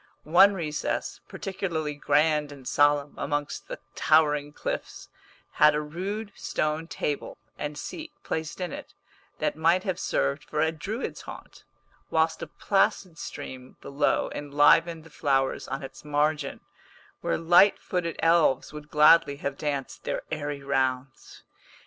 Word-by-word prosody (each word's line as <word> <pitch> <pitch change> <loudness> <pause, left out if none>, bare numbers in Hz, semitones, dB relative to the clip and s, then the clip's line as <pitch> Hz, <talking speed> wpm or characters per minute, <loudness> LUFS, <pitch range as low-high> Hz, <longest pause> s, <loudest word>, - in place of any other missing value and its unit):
One 185 +6 +6
recess, 155 -4 -3
particularly 170 -6 -3
grand 150 0 +2
and 135 -3 -11
solemn 145 0 +3
amongst 145 0 -3
the - - -6 0.2
towering 150 -2 +3
cliffs, - - -5 0.4
had 150 0 +5
a - - +1
rude 195 +8 -5
stone 155 +1 -2
table 145 -3 -3 0.2
and 150 0 -5
seat 320 - -7
placed 160 +2 -4
in 180 -3 -3
it, - - -9 0.4
that - - -1
might 165 +4 +3
have 185 -3 -2
served 145 +2 0
for 150 - -4
a 160 +1 +3
Druid's 200 - -5
haunt, - - -11 0.4
whilst 160 0 +1
a - - -4
placid 195 -4 0
stream 130 0 -8
below 140 +1 0
enlivened 145 +3 +3
the 165 - -16
flowers 135 -3 0
on 135 - -4
its 135 - -10
margin, 150 -1 0 0.6
where - - -1
light 175 +5 +5
footed 175 -3 -3
elves 165 -5 +3
would 150 0 -9
gladly 150 0 +6
have 140 -1 -4
danced 140 -2 -4
their - - -3
airy 145 -2 -4
rounds. 130 -1 -2
150 Hz, 135 wpm, -27 LUFS, 145-165 Hz, 0.6 s, One